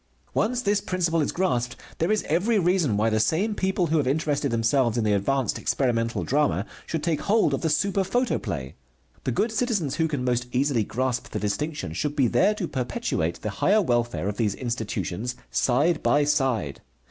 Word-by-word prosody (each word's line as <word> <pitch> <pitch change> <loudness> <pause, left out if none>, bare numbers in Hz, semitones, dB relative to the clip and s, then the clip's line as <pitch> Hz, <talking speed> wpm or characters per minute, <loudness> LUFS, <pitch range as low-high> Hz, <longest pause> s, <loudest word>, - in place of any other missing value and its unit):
Once 245 +3 0
this 205 0 +2
principle 170 -4 0
is 145 - 0
grasped 125 -9 0 0.2
there 165 +5 +1
is 215 - +1
every 195 +9 +2
reason 175 - +2
why 110 +2 +2
the 110 -1 +2
same 190 - +1
people 190 -2 0
who 160 0 +1
have 145 -4 +1
interested 145 0 0
themselves 115 +1 +1
in 115 - +1
the 105 -1 +2
advanced 125 +6 0
experimental 115 -3 0
drama 150 +2 +1 0.2
should 160 -2 -3
take 160 -2 0
hold 210 -8 +2
of 135 - -1
the 160 - 0
super 195 +5 +1
photoplay. 120 - -2 0.5
The 130 - +1
good 220 - 0
citizens 215 - -1
who 160 -1 +2
can 145 -5 -3
most 125 0 0
easily 130 -3 +1
grasp 125 +3 -2
the - - -3
distinction 105 - -3
should 145 - -2
be 140 -4 +3
there 200 - +3
to 190 -5 -3
perpetuate 85 - -2
the 110 - -2
higher 210 +2 +4
welfare 120 - 0
of 105 0 -3
these 105 -4 0
institutions 115 -2 -3 0.2
side 150 +6 +2
by 145 0 +3
side. 130 - 0
140 Hz, 185 wpm, -25 LUFS, 115-175 Hz, 0.5 s, higher